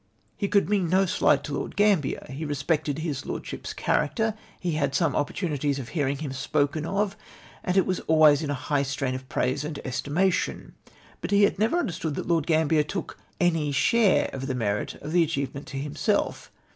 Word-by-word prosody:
He 200 - -1
could 200 -5 +3
mean 195 -4 +1
no 190 +2 +4
slight 145 -5 +2
to 145 - -5
Lord - - -4
Gramhier. 200 -9 +2
He 140 +4 -5
respected 145 0 -1
his 155 -4 -3
lordship's - - -5
character. 220 -2 0 0.3
He 180 - -1
had 140 -3 0
some - - +2
opportunities 145 -2 -1
of 125 -4 -6
hearing 140 -4 -1
him 145 -2 -5
spoken 145 +3 0
of, 200 +1 0 0.5
and 180 +1 0
it 190 - +5
was 185 -1 -1
always 155 -2 +6
in 150 - -3
a 145 - 0
high 140 +2 0
strain 135 -1 -2
of 130 0 -7
praise 130 +3 0
and 150 -1 -4
estimation. 150 +8 -1 0.5
But - - -4
he 205 0 +4
had 200 - +2
never 225 +11 +2
understood 165 - -2
that - - -4
Lord 165 -3 +1
Grambier 160 -1 +3
took 165 +5 -5 0.2
any 165 -4 +2
share 195 - +3
of 135 0 -4
the 130 - -2
merit 105 -4 -1
of 150 - -8
the 175 +1 +4
achievement 140 -3 -2
to 135 - -6
himself. 140 +1 -1
150 Hz, 190 wpm, -26 LUFS, 140-180 Hz, 0.5 s, always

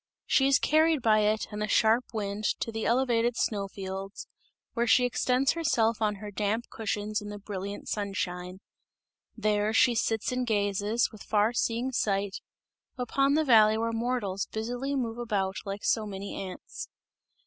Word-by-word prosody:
She 270 - +3
is 275 - +5
carried 315 -2 +3
by 215 -1 +5
it 215 +1 +1
and 210 0 -5
the 210 - 0
sharp 225 +3 +3
wind 205 -1 -3 0.2
to 230 - -2
the 220 0 -2
elevated 240 -1 +2
snow 200 -2 0
fields, 195 +1 -6 0.5
where 235 0 0
she 250 +2 +5
extends 255 +2 +2
herself 230 -10 +1
on 210 -1 +1
her 205 +1 -8
damp 210 +3 -1
cushions 215 -1 -2
in 205 - -7
the 205 - -6
brilliant 200 0 -6
sunshine. 185 -2 -3 0.8
There 210 -1 +1
she 240 +2 +5
sits 225 +1 0
and 250 0 -1
gazes, 205 +1 +1
with 215 -3 -13
far 215 +2 +1
seeing 240 +2 0
sight, 200 -4 0 0.6
upon 275 +3 +1
the 315 0 +2
valley 220 -4 +6
where 230 +1 -1
mortals 225 -4 -2
busily 245 +5 -3
move 235 -3 -2
about 195 -5 -1
like 200 +1 -5
so 220 -2 +1
many 200 0 -6
ants. 185 -2 -7
220 Hz, 160 wpm, -28 LUFS, 205-240 Hz, 0.8 s, valley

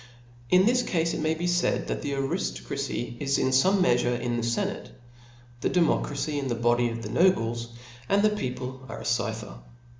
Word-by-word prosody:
In 185 +1 +5
this 250 +2 +3
cafe 165 -7 0
it - - -3
may 155 +1 +1
be 170 +2 -3
faid, 175 0 +1
that - - -3
the 145 -1 -3
ariftocracy 135 -4 -3
is 140 -1 +1
in 130 - +1
feme 185 +9 +4
meafure 120 -5 +2
in 120 0 -2
the 120 - -1
fenate, 115 0 -2 0.7
the - - 0
democracy 150 -4 +1
in. 140 - -3
the 120 - -1
body 120 +1 +2
of 115 0 -5
the 105 - -5
nobles, 120 -10 +2 0.4
and 200 +1 +3
the 215 - +4
people 130 -9 -4
are - - -7
a - - -9
cypher. 110 - -2
135 Hz, 185 wpm, -27 LUFS, 120-175 Hz, 0.7 s, In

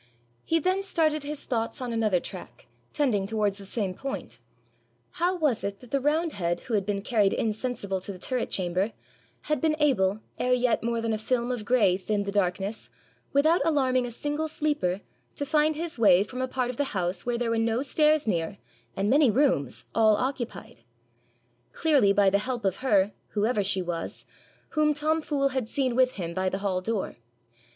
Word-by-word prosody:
He 330 - +1
then 370 +4 +1
started 315 -5 +1
his 290 +1 -6
thoughts 230 -3 -2
on 250 -2 -3
another 215 -5 +2
track, - - -10 0.3
tending 225 -10 +1
towards 210 -2 0
the 195 - -11
same 200 -3 -2
point: 270 +8 -6 0.8
how 360 +1 +2
was 295 -9 +1
it 200 0 -3
that 250 - -15
the 275 - +2
roundhead, 275 - 0
who 235 - -6
had 200 -2 +1
been 200 -1 -1
carried 210 -4 +2
insensible 215 -3 -2
to 200 - -5
the 190 - -8
turret 250 +6 -2
chamber, 185 +3 -1 0.5
had 300 -3 -1
been 315 -1 +2
able, 215 -9 +2 0.2
ere 250 0 +2
yet 250 -1 +2
more 235 0 -1
than 225 -1 0
a 215 - -2
film 240 +2 0
of 235 -4 -4
grey 205 -7 +3
thinned 205 +1 -1
the 200 - -2
darkness, 195 - -1 0.4
without 310 +5 +4
alarming 260 -5 +2
a - - -5
single 295 +6 -3
sleeper, 290 - -1 0.3
to 285 - -3
find 300 +2 +2
his 325 -4 -5
way 195 -4 +6
from 250 +4 -6
a 260 - 0
part 255 -1 -1
of 245 - -12
the 280 -8 -1
house 175 0 -1
where 240 -1 +1
there 235 -1 -1
were 230 - +1
no 225 +3 +1
stairs 305 +1 +3
near, 175 -2 -1 0.4
and 195 +1 0
many 275 +3 +5
rooms, 220 - +1
all 220 -1 +5
occupied? 245 -5 -4 1.0
Clearly 280 -11 +3
by 200 -1 +4
the 200 - +3
help 245 0 -3
of 190 -1 +1
her, 205 -6 +2 0.2
whoever 210 0 +1
she 190 -1 0
was, 170 -1 -5 0.4
whom 300 -1 +2
Tom 310 +2 +1
Fool 280 -3 0
had 260 -4 -3
seen 260 -3 0
with 255 0 +3
him 170 -4 -5
by 185 +1 0
the 190 - -2
hall 195 -2 -1
door. 210 - -2
230 Hz, 190 wpm, -27 LUFS, 200-280 Hz, 1.0 s, way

